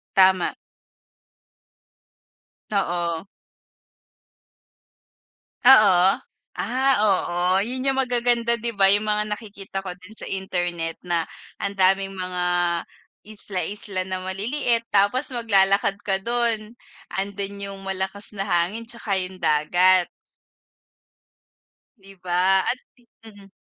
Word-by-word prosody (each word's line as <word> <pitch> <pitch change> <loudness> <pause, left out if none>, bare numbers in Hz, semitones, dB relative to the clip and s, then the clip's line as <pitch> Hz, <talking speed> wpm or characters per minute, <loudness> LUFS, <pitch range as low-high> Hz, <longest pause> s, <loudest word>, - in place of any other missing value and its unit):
Tama. 190 -2 +4 2.2
Oo. 175 -2 -1 2.4
Oo. 195 -7 +7 0.4
Ah, 260 +3 +1
oo. 185 -1 +2
Yun 255 +4 -3
yung 270 0 +1
magaganda 240 -2 +1
'di 235 0 -3
ba? 195 -1 +4
Yung 205 +1 +2
mga 210 0 +1
nakikita 200 -3 -8
ko 190 - -6
din 190 +4 -14
sa - - -6
internet 175 -3 -2
na 170 -1 +1 0.4
ang 200 0 -2
daming 195 +1 +2
mga 180 -1 -3 0.8
isla-isla 200 -2 -4
na 185 -1 -4
maliliit. 230 +5 0
Tapos 205 +8 +2
maglalakad 200 -3 +2
ka 195 -1 0
do'n. 235 -1 -1 0.4
Ando'n 200 +1 -3 0.2
yung 195 0 -9
malakas 190 +1 -4
na 195 0 -3
hangin 185 +6 0
tsaka 230 -4 -1
yung 185 0 -5
dagat. 175 +4 +3 1.9
Di 195 -1 -16
ba? 185 +2 +2
At 250 - 0 0.5
mhm. 205 -3 -14
195 Hz, 100 wpm, -23 LUFS, 185-220 Hz, 2.4 s, Oo